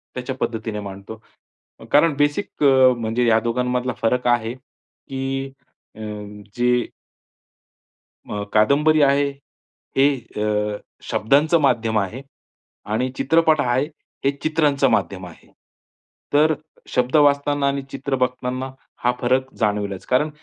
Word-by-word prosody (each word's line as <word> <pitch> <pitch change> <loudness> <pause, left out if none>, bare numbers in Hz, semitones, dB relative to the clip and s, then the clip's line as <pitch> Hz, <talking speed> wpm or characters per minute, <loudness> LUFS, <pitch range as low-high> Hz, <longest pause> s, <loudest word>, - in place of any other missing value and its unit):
त्याच्या 125 +1 -4
पद्धतीने 110 -2 -2
मांडतो. 100 +2 -9 0.7
कारण 150 +1 +4
बेसिक 145 +4 0
म्हणजे 125 -4 +4
या 110 -1 +5
दोघांमधला 125 +1 -1
फरक 125 +2 +1
आहे, 120 -1 +1
की 135 +1 -7 0.4
अ, 110 - -14 0.6
जे 125 0 +2 1.4
अ, 105 0 -3
कादंबरी 150 +8 +4
आहे, 140 0 +3 0.7
हे 135 +1 +6 0.4
अ, 105 -1 0 0.3
शब्दांचं 145 +9 +3
माध्यम 115 -5 +2
आहे 105 +7 -4 0.7
आणि 125 +4 0
चित्रपट 155 +3 +3
आहे, 130 +1 +1 0.4
हे 140 - +4
चित्रांचं 150 -3 +2
माध्यम 95 0 -1
आहे. 85 - -16 0.9
तर 155 +2 +5 0.4
शब्द 125 +3 +1
वाचताना 145 -1 +3
आणि 140 0 0
चित्र 140 0 -2
बघताना, 130 0 -2 0.3
हा 125 - +4
फरक 130 +2 +1
जाणवलाच, 105 -2 -1
कारण 140 +5 +2
125 Hz, 110 wpm, -21 LUFS, 115-140 Hz, 1.4 s, हे